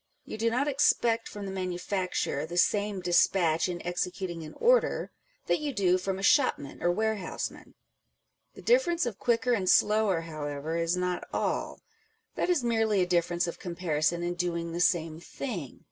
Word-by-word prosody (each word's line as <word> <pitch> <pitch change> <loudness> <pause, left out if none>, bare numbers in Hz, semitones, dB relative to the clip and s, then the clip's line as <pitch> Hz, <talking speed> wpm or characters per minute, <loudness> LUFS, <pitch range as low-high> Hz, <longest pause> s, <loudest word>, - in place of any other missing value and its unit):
You - - -6
do 230 +1 +2
not 255 +5 0
expect 240 -5 +2
from 205 -1 -7
the 195 - -5
manufacturer 185 -4 -2
the 175 +2 -6
same 205 +1 +1
despatch 175 -1 +2
in 175 -1 -5
executing 180 0 -3
an 155 -1 -9
order - - +2 0.3
that - - +1
you 300 -1 -2
do 185 -2 +3
from 190 +1 -2
a 195 - -6
shopman 255 - +2
or 175 - +2
ware 220 +3 0
houseman. 190 - -6 0.8
The - - -12
difference 455 - +3
of 230 -5 -4
quicker 240 0 +1
and 195 -5 0
sloioer, 210 -5 +3
however, 155 -1 -4
is 170 +1 0
not 180 0 -2
all: - - -2 0.5
that - - -1
is 345 -8 +2
merely 225 -4 +2
a - - 0
difference 175 -1 +1
of 170 - -6
comparison 170 -2 -1
in 175 0 -1
doing 170 -1 -2
the 170 +1 -2
same 165 -3 +1
thing. 175 - -6
180 Hz, 170 wpm, -28 LUFS, 170-220 Hz, 0.8 s, do